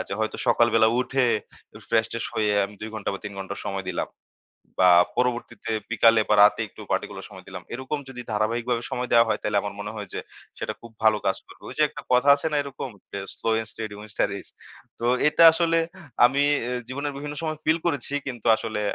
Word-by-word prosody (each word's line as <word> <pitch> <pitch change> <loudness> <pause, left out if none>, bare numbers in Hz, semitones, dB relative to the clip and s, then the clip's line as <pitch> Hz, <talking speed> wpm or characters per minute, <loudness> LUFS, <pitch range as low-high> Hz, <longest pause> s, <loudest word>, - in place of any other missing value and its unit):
আচ্ছা, 100 - -4
হয়তো 110 - -1
সকাল 120 - +4
বেলা 110 -1 +6
উঠে 135 +1 +1 0.4
একটু - - -15
ফ্রেশ 110 -1 +3
ট্রেশ 115 - -3
হয়ে 105 -1 +1 0.2
আমি 105 - -14
২ 110 +1 -6
ঘন্টা 110 -2 -2
বা - - -5
৩ 105 - -5
ঘন্টা 95 +1 -5
সময় 95 -1 -3
দিলাম। - - -3 0.7
বা 90 -1 +7 0.3
পরবর্তীতে 120 -2 -1 0.2
বিকালে 115 0 +5
বা 105 - +5
রাতে 105 +2 +5
একটু - - -14
পার্টিকুলার - - -3
সময় - - -12
দিলাম। - - -8
এরকম 130 +4 -3
যদি 125 -2 -7
ধারাবাহিকভাবে 115 +3 0
সময় 125 0 -2
দেয়া 115 0 +6
হয়, 110 - 0
তাহলে 105 -1 +1
আমার 100 -1 -5
মনে 105 +1 -5
হয় 105 -2 -6
যে, - - -3 0.4
সেটা - - -3
খুব 115 - -12
ভালো 110 -1 +5
কাজ 95 - +2
করবে। - - -17
ওই - - -9
যে, - - +6
একটা - - -9
কথা 125 +3 +4
আছে 145 - -3
না? - - 0
এরকম 135 -1 -6 0.5
slow - - -2
and 110 0 -2
steady 110 -2 -6
wins 105 0 -10
studies 100 - -1 0.5
তো 120 - -3 0.2
এটা 165 - +4
আসলে 165 0 +2 0.5
আমি 135 +3 +2 0.2
অ্যা 125 +1 -2
জীবনের 140 +2 -3
বিভিন্ন 145 +1 -6
সময় 155 -1 -2
ফিল 155 +1 +4
করেছি, 145 -4 -2
কিন্তু 120 -3 -5
আসলে 110 -2 -3
115 Hz, 210 wpm, -25 LUFS, 105-130 Hz, 0.7 s, বা